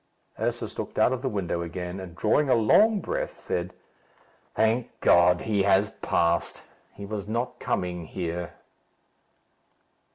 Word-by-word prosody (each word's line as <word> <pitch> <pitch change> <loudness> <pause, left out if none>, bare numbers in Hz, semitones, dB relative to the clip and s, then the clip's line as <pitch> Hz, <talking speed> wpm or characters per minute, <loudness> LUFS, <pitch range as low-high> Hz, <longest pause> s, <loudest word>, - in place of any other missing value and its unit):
Ursus - - -3
looked - - -5
out 125 - +4
of 130 - -3
the 130 - -1
window 90 -5 -2
again, 90 +2 -5
and 90 -3 -9
drawing 135 +9 +2
a - - +5
long 205 - +4
breath, - - -3
said, 90 +1 -3 0.8
"Thank 115 +2 +1
God! 90 0 +5
He 105 -3 0
has 100 +1 +3
passed. 85 0 0 0.3
He 100 - -9
was 100 -1 -5
not 115 +3 -3
coming 90 -2 -2
here." 85 -1 -4
100 Hz, 135 wpm, -26 LUFS, 90-110 Hz, 0.8 s, a